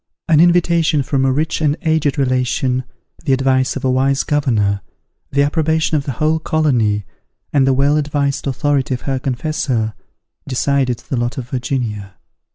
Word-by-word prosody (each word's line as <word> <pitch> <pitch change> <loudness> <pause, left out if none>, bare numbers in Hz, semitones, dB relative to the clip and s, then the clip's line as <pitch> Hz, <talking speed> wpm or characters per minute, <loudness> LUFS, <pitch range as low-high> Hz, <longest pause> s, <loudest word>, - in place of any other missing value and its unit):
an 155 -2 +4
invitation 170 -3 +3
from 135 0 0
a 135 - +3
rich 155 +4 -1
and 150 0 +1
aged 160 -3 +1
relation, 130 -1 0 0.4
the 140 -4 +1
advice 130 0 +1
of 135 -1 -4
a 130 - +2
wise 135 +1 +2
governor, 110 -9 +1 0.5
the 140 +1 +3
approbation 160 +2 +1
of 145 -2 0
the 135 - -3
whole 155 +5 +1
colony, 120 -11 +1 0.5
and 135 -2 +3
the - - +4
well 140 +3 +2
advised 145 -1 -1
authority 135 0 0
of 120 - -8
her 135 -2 -2
confessor, 130 -4 -2 0.5
decided 135 -1 0
the 130 - -5
lot 120 +2 -2
of 125 -2 -5
Virginia. 115 -6 -3
135 Hz, 160 wpm, -18 LUFS, 125-150 Hz, 0.5 s, an